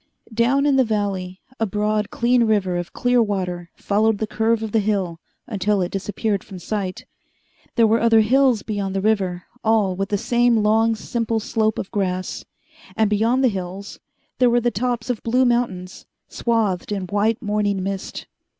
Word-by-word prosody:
Down 250 Hz, +5 st, +2 dB
in 280 Hz, -2 st, +3 dB
the 260 Hz, -, +5 dB
valley 200 Hz, -4 st, -2 dB, 0.2 s
a 225 Hz, -, +1 dB
broad, 210 Hz, +1 st, -1 dB
clean 240 Hz, 0 st, +2 dB
river 200 Hz, -5 st, +1 dB
of 175 Hz, -1 st, -4 dB
clear 245 Hz, 0 st, +2 dB
water 180 Hz, -5 st, -2 dB
followed 215 Hz, +1 st, +1 dB
the 220 Hz, -, -1 dB
curve 225 Hz, +1 st, 0 dB
of 220 Hz, -, -4 dB
the 225 Hz, -, +3 dB
hill 195 Hz, -5 st, -1 dB, 0.3 s
until 205 Hz, -1 st, 0 dB
it 180 Hz, -1 st, -1 dB
disappeared 200 Hz, +1 st, -2 dB
from 195 Hz, -, -10 dB
sight. 185 Hz, 0 st, -4 dB, 0.7 s
There 230 Hz, -, +5 dB
were 225 Hz, +1 st, +3 dB
other 225 Hz, -1 st, +5 dB
hills 250 Hz, 0 st, +3 dB
beyond 200 Hz, -3 st, -3 dB
the 195 Hz, -, 0 dB
river, 190 Hz, -4 st, 0 dB, 0.2 s
all 215 Hz, -4 st, +2 dB
with 195 Hz, +1 st, -3 dB
the 205 Hz, -, +1 dB
same 240 Hz, 0 st, +2 dB
long, 225 Hz, +2 st, +3 dB
simple 225 Hz, 0 st, -2 dB
slope 220 Hz, 0 st, 0 dB
of 190 Hz, -, -5 dB
grass; 185 Hz, -2 st, -2 dB, 0.5 s
and, 220 Hz, -1 st, +2 dB
beyond 230 Hz, +5 st, +2 dB
the -, -, +6 dB
hills, 195 Hz, -1 st, -5 dB, 0.4 s
there 250 Hz, -1 st, +5 dB
were 240 Hz, 0 st, +3 dB
the 240 Hz, 0 st, 0 dB
tops 245 Hz, +2 st, -1 dB
of 235 Hz, -, -4 dB
blue 250 Hz, +3 st, +2 dB
mountains, 230 Hz, -7 st, -1 dB, 0.2 s
swathed 215 Hz, -6 st, -1 dB
in 200 Hz, -2 st, -2 dB
white 205 Hz, +5 st, 0 dB
morning 205 Hz, -3 st, -1 dB
mist. 195 Hz, 0 st, -5 dB
215 Hz, 175 wpm, -21 LUFS, 195-230 Hz, 0.7 s, the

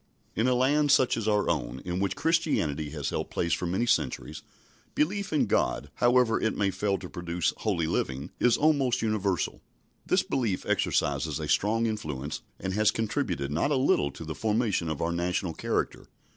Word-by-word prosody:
In 115 Hz, -, +2 dB
a 125 Hz, -, +3 dB
land 145 Hz, +3 st, +3 dB
such 130 Hz, -3 st, +4 dB
as 115 Hz, -2 st, -3 dB
our 105 Hz, -1 st, +2 dB
own, 65 Hz, +2 st, -1 dB
in 90 Hz, 0 st, -2 dB
which 100 Hz, 0 st, 0 dB
Christianity 115 Hz, -, 0 dB
has -, -, -4 dB
held -, -, -3 dB
place 85 Hz, -2 st, -1 dB
for 90 Hz, -, -1 dB
many 95 Hz, +7 st, 0 dB
centuries, 75 Hz, -9 st, -1 dB, 0.5 s
belief 200 Hz, +6 st, 0 dB
in 150 Hz, -, +2 dB
God, 70 Hz, -, 0 dB
however 120 Hz, -2 st, +3 dB
it 110 Hz, -, 0 dB
may 100 Hz, -1 st, +1 dB
fail 100 Hz, +1 st, 0 dB
to 90 Hz, -, -8 dB
produce 85 Hz, 0 st, -2 dB
holy 95 Hz, -7 st, 0 dB
living, 70 Hz, -3 st, -2 dB
is 120 Hz, -1 st, +4 dB
almost 140 Hz, -6 st, +2 dB
universal. 100 Hz, -5 st, -1 dB, 0.4 s
This -, -, +2 dB
belief 115 Hz, -8 st, -1 dB
exercises 70 Hz, +1 st, 0 dB
a -, -, -4 dB
strong 115 Hz, +3 st, +2 dB
influence, 75 Hz, -, -3 dB, 0.2 s
and 95 Hz, -1 st, -3 dB
has 110 Hz, +1 st, +3 dB
contributed 70 Hz, -10 st, -1 dB
not 85 Hz, -, +1 dB
a 145 Hz, -, +2 dB
little 130 Hz, -, +2 dB
to 80 Hz, -, -8 dB
the 80 Hz, -, -4 dB
formation 105 Hz, -4 st, 0 dB
of 80 Hz, -1 st, -2 dB
our 85 Hz, -, 0 dB
national 85 Hz, 0 st, -1 dB
character. -, -, -2 dB
100 Hz, 180 wpm, -28 LUFS, 80-120 Hz, 0.5 s, such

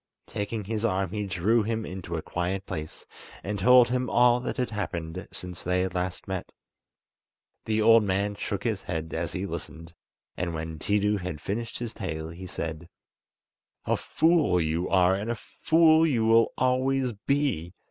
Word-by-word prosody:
Taking 105 Hz, +1 st, -4 dB
his 110 Hz, +2 st, -3 dB
arm 95 Hz, -5 st, 0 dB
he 105 Hz, -1 st, -3 dB
drew 95 Hz, +5 st, +2 dB
him 110 Hz, +1 st, -2 dB
into 90 Hz, -2 st, -6 dB
a 80 Hz, -, -5 dB
quiet 95 Hz, +2 st, -2 dB
place 75 Hz, 0 st, -6 dB, 0.4 s
and 100 Hz, 0 st, -3 dB
told 125 Hz, +4 st, +6 dB
him 125 Hz, -1 st, 0 dB
all 120 Hz, +2 st, +5 dB
that 125 Hz, -, -4 dB
had 125 Hz, -2 st, -1 dB
happened 90 Hz, -3 st, -4 dB
since 90 Hz, -1 st, -6 dB
they 90 Hz, +1 st, +1 dB
had 95 Hz, 0 st, -2 dB
last 90 Hz, 0 st, -3 dB
met. 95 Hz, -2 st, -4 dB, 1.1 s
The 110 Hz, 0 st, +1 dB
old 115 Hz, 0 st, +7 dB
man 100 Hz, +1 st, 0 dB
shook 100 Hz, 0 st, -4 dB
his 110 Hz, -5 st, -1 dB
head 80 Hz, -3 st, -4 dB
as 80 Hz, -1 st, -2 dB
he 95 Hz, +2 st, -2 dB
listened, 85 Hz, -3 st, -7 dB, 0.4 s
and 85 Hz, -2 st, -3 dB
when 80 Hz, 0 st, -5 dB
Tiidu 105 Hz, +3 st, +1 dB
had 90 Hz, -4 st, -5 dB
finished 115 Hz, +7 st, -4 dB
his 120 Hz, -2 st, -5 dB
tale, 80 Hz, -6 st, -4 dB
he 90 Hz, +3 st, -8 dB
said: 80 Hz, -1 st, -5 dB, 1.0 s
"A -, -, +2 dB
fool 160 Hz, -, +2 dB
you 80 Hz, +2 st, -1 dB
are, 95 Hz, -1 st, +4 dB
and 100 Hz, +4 st, -2 dB
a 120 Hz, -, 0 dB
fool 160 Hz, +5 st, +3 dB
you 120 Hz, -7 st, +1 dB
will 115 Hz, 0 st, +5 dB
always 130 Hz, 0 st, +1 dB, 0.2 s
be! 130 Hz, -, 0 dB
100 Hz, 170 wpm, -27 LUFS, 90-115 Hz, 1.1 s, old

